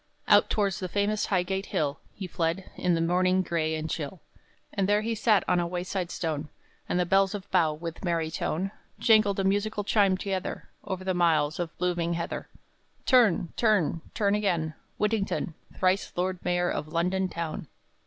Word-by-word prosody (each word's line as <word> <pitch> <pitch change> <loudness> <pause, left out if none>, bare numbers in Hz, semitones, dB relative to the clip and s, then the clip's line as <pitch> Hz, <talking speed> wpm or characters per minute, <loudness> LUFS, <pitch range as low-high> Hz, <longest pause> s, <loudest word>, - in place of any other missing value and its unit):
Out - - +6
towards 200 -4 0
the 185 - -3
famous 205 +3 0
Highgate 190 +1 0
Hill 145 -1 -1 0.2
He 195 - -5
fled, 170 +1 -2
in 180 -1 +1
the 165 - 0
morning 185 +2 +2
gray 160 -3 0
and 155 0 -3
chill; 160 +3 -4 0.5
And 200 -1 0
there 205 +1 +4
he 230 +1 -1
sat 220 -1 +3
on 180 - +3
a 175 - 0
wayside 180 +1 -3
stone, 155 -4 -3 0.4
And 180 - +1
the 180 - +2
bells 195 +2 +3
of 200 -2 -7
Bow, 170 -5 +3
with 165 +3 -7
merry 165 -3 0
tone, 185 +5 -2 0.3
Jangled 215 -3 +4
a - - +1
musical 205 +2 0
chime 200 -2 +3
together, 190 -1 -4
Over 190 -1 -4
the 185 0 0
miles 160 -4 +2
of 170 -2 -4
blooming 175 -1 0
heather: 170 0 -4 0.6
"Turn, 220 -10 +4
turn, 205 -8 +2
turn 205 -3 +2
again, 175 -7 0 0.2
Whittington, 210 -5 0 0.2
Thrice 185 +1 +1
Lord 180 0 -1
Mayor 175 0 +1
of 155 - -3
London 180 +4 0
town!" 170 -2 -4
180 Hz, 175 wpm, -28 LUFS, 170-200 Hz, 0.6 s, Out